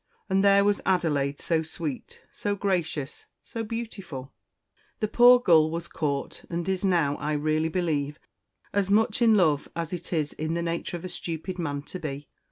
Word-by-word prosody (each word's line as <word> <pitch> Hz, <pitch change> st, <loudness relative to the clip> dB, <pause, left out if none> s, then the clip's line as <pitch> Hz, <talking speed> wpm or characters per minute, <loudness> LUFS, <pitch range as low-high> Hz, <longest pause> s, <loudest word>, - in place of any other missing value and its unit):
And 190 Hz, +1 st, +3 dB
there 200 Hz, 0 st, +6 dB
was 205 Hz, 0 st, +2 dB
Adelaide 145 Hz, -7 st, +1 dB
so 165 Hz, -2 st, +1 dB
sweet 155 Hz, -4 st, -6 dB
so 205 Hz, -1 st, -2 dB
gracious 175 Hz, -8 st, -2 dB, 0.2 s
so 230 Hz, -, -5 dB
beautiful 210 Hz, -, -6 dB, 0.7 s
the 215 Hz, -, 0 dB
poor 245 Hz, +3 st, +7 dB
gull 160 Hz, -9 st, +5 dB
was 165 Hz, +1 st, -4 dB
caught, 140 Hz, -3 st, -3 dB
and 170 Hz, 0 st, -3 dB
is 190 Hz, 0 st, -1 dB
now, 170 Hz, -7 st, +2 dB
I 150 Hz, +1 st, -2 dB
really 155 Hz, +2 st, +1 dB
believe, 150 Hz, -4 st, -1 dB, 0.6 s
as 200 Hz, -1 st, +1 dB
much 215 Hz, +3 st, +2 dB
in 225 Hz, -2 st, +6 dB
love 155 Hz, -7 st, +2 dB
as 165 Hz, 0 st, -3 dB
it 175 Hz, 0 st, -6 dB
is 155 Hz, -4 st, -1 dB
in 155 Hz, +2 st, -3 dB
the 170 Hz, -, -1 dB
nature 170 Hz, +1 st, -3 dB
of 170 Hz, -, -9 dB
a -, -, -2 dB
stupid 175 Hz, +2 st, -5 dB
man 145 Hz, -4 st, -2 dB
to 185 Hz, -, -8 dB
be. 145 Hz, -2 st, -6 dB
170 Hz, 175 wpm, -27 LUFS, 150-195 Hz, 0.7 s, poor